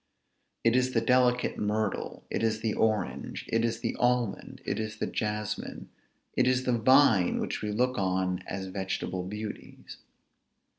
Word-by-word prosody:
It 115 +1 +4
is 130 0 +2
the 115 - +4
delicate 125 +1 +2
myrtle, 105 -1 -2
it - - -1
is 110 -1 0
the 110 -2 0
orange, 110 -1 -1
it 115 0 +2
is 115 0 -1
the 115 - -2
almond, 125 -4 0
it - - -1
is 110 -1 -4
the - - -1
jasmine, 105 0 -3 0.5
it - - +3
is 130 0 +2
the 125 -1 +2
vine 115 -6 +5
which - - -3
we 105 - -2
look 125 +3 +1
on 95 -1 0
as 95 0 -4
vegetable 95 -1 -3
beauties. 105 +3 -7
110 Hz, 155 wpm, -29 LUFS, 105-125 Hz, 0.5 s, vine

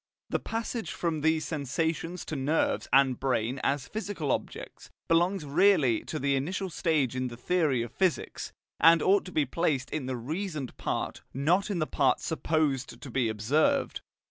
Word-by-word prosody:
The - - +1
passage 225 -4 -4
from 165 -3 -2
these 160 +1 +2
sensations 160 +4 -2
to 155 - -4
nerves 145 +4 0
and 135 -2 +4
brain 130 -1 0
as 140 -1 0
physical 205 -10 -3
objects - - -5 0.2
belongs 175 +1 +2
really 145 - +3
to 155 - -4
the 140 -1 +1
initial 180 +7 -2
stage 155 -7 +1
in 130 0 -1
the 120 -1 -8
theory 145 -4 +1
of 120 - -7
physics, 185 0 -1 0.3
and 165 0 +6
ought 195 +1 +4
to 185 - -8
be 155 -4 +1
placed 140 -2 -1
in 145 -5 -3
the 130 -1 -2
reasoned 155 - -4
part, - - -3
not 175 +10 +2
in 200 - -1
the 155 - +1
part 135 -4 +2
supposed 150 -7 -1
to 130 0 -9
be 120 -2 +1
observed. 145 - +1
155 Hz, 170 wpm, -29 LUFS, 130-175 Hz, 0.3 s, and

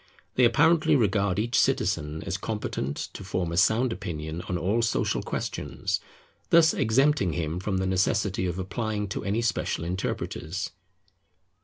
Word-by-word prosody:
They 125 - +4
apparently 155 +6 +4
regard 100 -5 +2
each 115 +3 +1
citizen 75 +1 0
as 95 -1 -3
competent 95 -9 -3 0.2
to - - -8
form 90 -2 -2
a - - -2
sound 115 +5 +3
opinion 80 -4 -5
on 90 - 0
all 100 +7 +1
social 115 - 0
questions, - - -3 0.5
thus 165 -1 +6
exempting 130 - +2
him 80 0 -2
from 95 0 -1
the 95 - 0
necessity 95 0 +1
of 90 0 -3
applying 105 +2 -3
to - - -4
any 105 +4 0
special 110 -7 -1
interpreters. 90 0 -3
100 Hz, 145 wpm, -27 LUFS, 90-115 Hz, 0.5 s, thus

